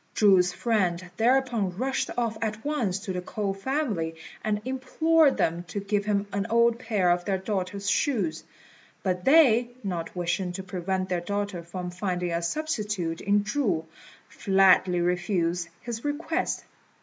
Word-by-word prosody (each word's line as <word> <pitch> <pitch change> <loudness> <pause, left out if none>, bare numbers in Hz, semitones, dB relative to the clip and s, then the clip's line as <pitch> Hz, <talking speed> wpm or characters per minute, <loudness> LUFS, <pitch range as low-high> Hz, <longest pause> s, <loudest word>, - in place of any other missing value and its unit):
Chu's 190 -4 +5
friend 185 -5 0
thereupon 235 -6 +2
rushed 265 +3 -1
off 230 -2 0
at 220 +1 -3
once 245 -11 0
to 195 -3 -4
the 180 - -3
K'ou 195 +1 -3
family, 200 - -2 0.3
and 210 -1 0
implored 280 +4 +2
them 165 +1 +1
to 200 - -4
give 200 0 -1
him 205 -1 +1
an 200 +1 -1
old 235 0 +3
pair 210 -7 +1
of 175 0 +1
their 190 +1 0
daughter's 195 0 -3
shoes; 195 - 0 0.6
but 180 -2 -1
they, 255 -5 +6
not 175 -4 -4
wishing 180 +1 -1
to 190 +1 -5
prevent 185 0 -2
their 180 -2 -1
daughter 200 -1 -3
from 180 +1 -6
finding 180 -1 -2
a 170 0 0
substitute 205 - -2
in 205 +1 +2
Chu, 205 - 0 0.4
flatly 190 -2 +4
refused 175 -1 0
his 235 -1 -5
request. 320 +3 -2
200 Hz, 150 wpm, -27 LUFS, 180-230 Hz, 0.6 s, they